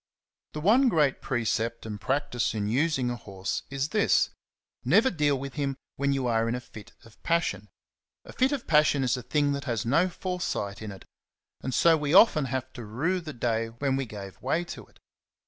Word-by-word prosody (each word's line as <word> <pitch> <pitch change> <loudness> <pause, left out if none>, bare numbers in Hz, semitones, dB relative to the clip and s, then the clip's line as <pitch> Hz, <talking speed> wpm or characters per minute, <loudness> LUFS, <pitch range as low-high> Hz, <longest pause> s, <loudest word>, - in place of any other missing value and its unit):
The 150 - -5
one 240 - +5
great 150 - +2
precept 115 -2 -1
and 105 -2 -6
practice 130 -3 -1
in 105 -1 -1
using 130 +1 +1
a - - -2
horse 95 -4 -4
is 140 +1 -2
this, 215 +2 +2 0.3
— - - -57
never 260 - +4
deal 150 -4 +1
with 135 0 -6
him 140 -3 -2 0.2
when 140 +1 0
you 135 -2 0
are 115 -1 +1
in 120 - 0
a - - -3
fit 110 -4 -13
of 115 - -19
passion. 105 - -1 0.6
A - - -11
fit 260 +2 +2
of 280 -4 -3
passion 150 -3 +3
is 125 -1 +2
a 125 - -5
thing 145 +3 +1
that 140 +1 -3
has 115 -6 -2
no 165 +10 +3
foresight 175 - -3
in 110 -1 -6
it, 95 -2 -12 0.6
and 130 - -3
so 165 +6 +5
we 150 +2 0
often 170 -8 +6
have 130 0 -4
to 120 - -8
rue 150 - -1
the 160 -2 -7
day 115 -3 -1
when 130 +4 -1
we 135 -1 -2
gave 100 -3 -9
way 170 - 0
to 175 - -9
it. - - -25
135 Hz, 205 wpm, -27 LUFS, 115-155 Hz, 0.6 s, often